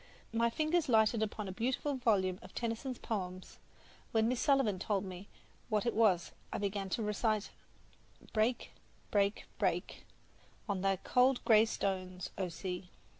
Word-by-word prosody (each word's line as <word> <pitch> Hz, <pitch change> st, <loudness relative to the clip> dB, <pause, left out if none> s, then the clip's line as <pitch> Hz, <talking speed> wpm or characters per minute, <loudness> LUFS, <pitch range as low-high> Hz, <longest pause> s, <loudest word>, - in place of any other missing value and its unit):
My 230 Hz, +1 st, +3 dB
fingers 310 Hz, +5 st, +1 dB
lighted 220 Hz, -1 st, +4 dB
upon 210 Hz, -1 st, -2 dB
a -, -, -4 dB
beautiful 255 Hz, +8 st, -1 dB
volume 200 Hz, -8 st, +1 dB
of -, -, -13 dB
Tennyson's 235 Hz, +2 st, -3 dB
poems, 185 Hz, -4 st, -5 dB, 0.4 s
and -, -, -31 dB
when 220 Hz, 0 st, +3 dB
Miss 245 Hz, 0 st, 0 dB
Sullivan 265 Hz, -9 st, +3 dB
told 200 Hz, 0 st, 0 dB
me 185 Hz, +1 st, -8 dB, 0.4 s
what 215 Hz, 0 st, +1 dB
it 235 Hz, -, +1 dB
was 200 Hz, -6 st, +3 dB, 0.2 s
I -, -, -2 dB
began 200 Hz, -1 st, -2 dB
to 225 Hz, +4 st, -1 dB
recite: 210 Hz, 0 st, 0 dB, 0.8 s
Break, 225 Hz, +3 st, +1 dB, 0.4 s
break, 200 Hz, +1 st, +1 dB
break -, -, -1 dB, 0.6 s
On 200 Hz, -3 st, -1 dB
thy 195 Hz, 0 st, +2 dB
cold 250 Hz, +6 st, +2 dB
gray 220 Hz, -1 st, +7 dB
stones, 185 Hz, -4 st, -3 dB
O 185 Hz, -2 st, -2 dB
sea! 180 Hz, +1 st, -5 dB
215 Hz, 150 wpm, -34 LUFS, 190-235 Hz, 0.8 s, gray